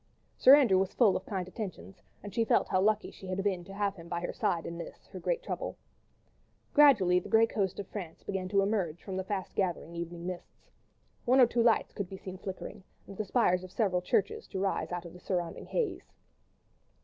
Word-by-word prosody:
Sir 265 - +9
Andrew 235 -10 +4
was 190 0 -1
full 220 -6 +5
of - - -4
kind 185 -3 -3
attentions, 185 - -7 0.2
and 205 - -8
she 230 - +2
felt - - +2
how 185 - +2
lucky 215 +1 +1
she 190 - -11
had 185 +1 -2
been 190 -3 0
to 195 - -10
have 200 -1 0
him 165 0 -11
by 170 0 -2
her 175 - -3
side 165 -2 0
in 170 - -5
this, - - -9
her - - -7
great - - -1
trouble. - - -4 1.0
Gradually 205 -12 +6
the - - -10
grey 225 0 +6
coast 200 -4 -2
of 200 - -4
France 180 -6 -7
began 190 -2 -3
to 195 +1 +3
emerge 190 -6 -1
from 190 - -5
the 190 - -2
fast 190 0 -4
gathering 175 -3 -1
evening 170 0 -5
mists. 180 -1 -8 0.5
One 255 +2 +5
or 255 - +9
two 235 0 0
lights 230 -1 +3
could 200 -3 -4
be 190 - -7
seen 185 -1 -8
flickering, 190 +1 -7 0.2
and 195 - -10
the 215 - -2
spires 185 -4 +2
of 185 - -10
several 190 -5 +1
churches 195 +2 0
to 190 - -5
rise 195 -1 -1
out 175 0 -4
of 170 - -9
the 180 - -12
surrounding 175 -2 -3
haze. 480 -3 -2
190 Hz, 220 wpm, -30 LUFS, 180-210 Hz, 1.0 s, Sir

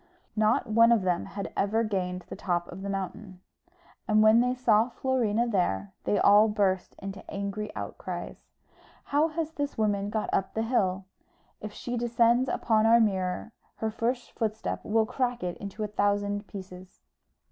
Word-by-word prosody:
Not 215 +1 +2
one 230 +1 +5
of 230 -5 +3
them 180 -2 0
had 200 -1 -6
ever 215 +3 +1
gained 180 -4 -2
the - - -7
top 175 -2 -1
of 185 - -8
the 200 - -4
mountain; 195 0 -5 0.7
and 215 -1 +4
when 220 +1 +6
they 250 +1 +1
saw 230 -2 +3
Florina 240 -3 0
there, 100 - -1
they 205 - +2
all 210 +2 +6
burst 200 -3 0
into 195 0 -7
angry 200 +1 -4
outcries, - - -6 0.6
"How 295 +3 +2
has 320 0 -3
this 285 -2 -4
woman 205 -2 0
got 215 0 -2
up 190 - -1
the 220 - 0
hill? 195 -5 0 0.5
If 215 - -7
she 245 +3 -5
descends 240 +2 +2
upon 220 -1 +2
our 230 +1 +6
mirror 190 -1 0 0.2
her 220 0 -2
first 240 +3 -2
footstep 220 -1 -3
will 220 +1 +2
crack 245 -1 -2
it 175 -1 -2
into 200 +2 -6
a - - -1
thousand 205 0 0
pieces." 185 -1 -10
215 Hz, 165 wpm, -28 LUFS, 195-230 Hz, 0.7 s, when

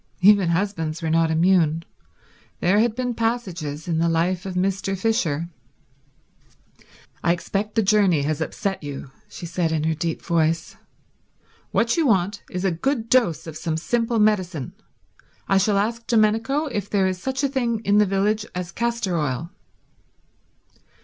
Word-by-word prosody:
Even 200 -2 +6
husbands 170 -3 -1
were 160 - 0
not 165 0 +3
immune. 165 -1 +2 0.7
There 190 +4 +3
had 225 0 +2
been 250 -1 -2
passages 185 -11 -3
in 165 -2 0
the 170 0 +2
life 175 +3 0
of 185 - -5
Mr. 195 +1 -1
Fisher... 175 -7 0 1.7
"I 170 - +3
expect 200 +4 -3
the 225 - +3
journey 195 -7 +3
has 155 +2 -1
upset 195 +4 -2
you," 140 -2 -7 0.2
she - - -8
said 170 -1 -1
in 155 -1 0
her 160 +1 +1
deep 165 +1 -3
voice. 165 0 0 0.9
"What 230 +5 +1
you 325 -3 +3
want 200 -2 +1
is 180 +1 -3
a 190 - +3
good 230 - -1
dose 170 - +2
of 160 -2 -8
some 160 0 -2
simple 230 +6 0
medicine. 185 - +1 0.7
I 195 - +4
shall 200 +1 +2
ask 230 +3 -1
Domenico 225 +6 +2
if 210 - -4
there 195 -2 +2
is 185 -1 -2
such 265 +4 -2
a - - +4
thing 240 -4 -1
in 205 -1 +3
the 210 - +4
village 205 +3 +1
as 180 -1 -4
castor 235 -4 -1
oil." 150 +3 -2
190 Hz, 155 wpm, -23 LUFS, 165-220 Hz, 1.7 s, Even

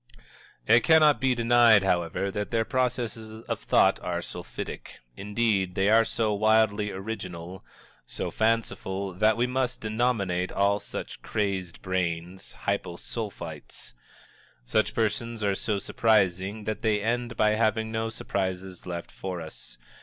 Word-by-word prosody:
It 115 +2 +6
cannot 155 +1 +5
be 130 -1 +3
denied, 115 -3 +5
however, 90 +1 0
that 105 +1 -3
their 115 -1 +1
processes 115 -3 -2
of - - -3
thought - - +3
are - - -3
sulphitic; - - -7 0.2
indeed, 100 - 0
they 95 +1 +2
are 115 +1 +6
so 110 -2 0
wildly 110 0 +3
original, 95 -3 -6 0.4
so - - -4
fanciful, 100 -4 -1
that 110 +4 +3
we 120 - +2
must 125 0 -1
denominate 110 -5 0
all 100 +1 +2
such - - -7
crazed 95 -5 -3
brains, 90 0 -3
Hypo 85 - -2
Sulphites. 85 -7 -7 0.7
Such - - +1
persons 115 0 -1
are 100 -1 +2
so 105 +1 -1
surprising 100 -1 +1
that 110 0 -3
they 110 -2 +2
end 120 0 -1
by 105 0 +4
having 110 0 +1
no 110 0 -1
surprises 95 -4 -4
left 85 -1 -5
for 95 -2 -5
us. 80 -6 -10
105 Hz, 135 wpm, -27 LUFS, 95-115 Hz, 0.7 s, It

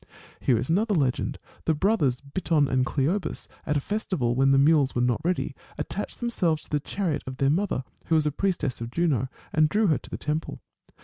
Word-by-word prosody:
^ - - -22 0.4
Here 125 - +2
is 120 - -2
another 210 +4 +2
legend. 135 -6 0 0.3
The 160 - +2
brothers 150 - +2
Biton 150 0 +1
and 130 -1 +2
Cleobus, 165 +8 -1 0.2
at 150 -1 +2
a - - +2
festival, 180 - -1
when 135 +2 +3
the 135 - +5
mules 140 -1 +4
were 120 - +2
not 125 +3 +1
ready, 180 +2 -1 0.2
attached - - -4
themselves 180 -10 0
to - - -17
the 150 - +2
chariot 165 0 -2
of 130 0 -5
their 135 +1 +3
mother, 185 -5 0 0.2
who 165 - +2
was 155 -1 +3
a 150 - +2
priestess 160 -7 -1
of 115 - -4
Juno, 140 -3 +1 0.3
and 155 -1 +4
drew 215 +5 +2
her 155 - +2
to - - -13
the - - -4
temple. 155 +2 -3
150 Hz, 210 wpm, -26 LUFS, 135-180 Hz, 0.4 s, the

